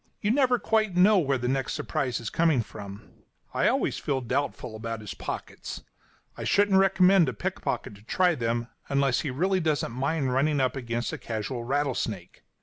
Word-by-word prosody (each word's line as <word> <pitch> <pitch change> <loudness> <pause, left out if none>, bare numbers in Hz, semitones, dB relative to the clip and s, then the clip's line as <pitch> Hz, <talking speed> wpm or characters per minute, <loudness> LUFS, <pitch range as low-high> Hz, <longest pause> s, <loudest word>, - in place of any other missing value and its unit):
You 210 - +1
never 255 -1 +3
quite 220 -5 +1
know 200 +2 +6
where 140 -5 +1
the 125 0 -3
next 135 0 -1
surprise 125 -3 -2
is 115 - -5
coming 160 -8 +2
from. 100 +1 -10 0.4
I - - +2
always - - +1
feel 135 -2 -1
doubtful 125 -2 -2
about 115 0 -4
his 105 - -6
pockets. - - -6 0.5
I - - -6
shouldn't 200 -1 +4
recommend 190 -3 +5
a - - -4
pickpocket 105 - -3
to 100 - -15
try 180 - +2
them, 115 -3 -1 0.2
unless 140 -2 +2
he 150 - -2
really 185 +9 +1
doesn't 155 -7 0
mind 135 +1 -1
running 145 +2 +2
against 120 -3 -1
a - - -5
casual 115 +2 -4
rattlesnake. 125 -9 -2
135 Hz, 170 wpm, -27 LUFS, 120-180 Hz, 0.5 s, know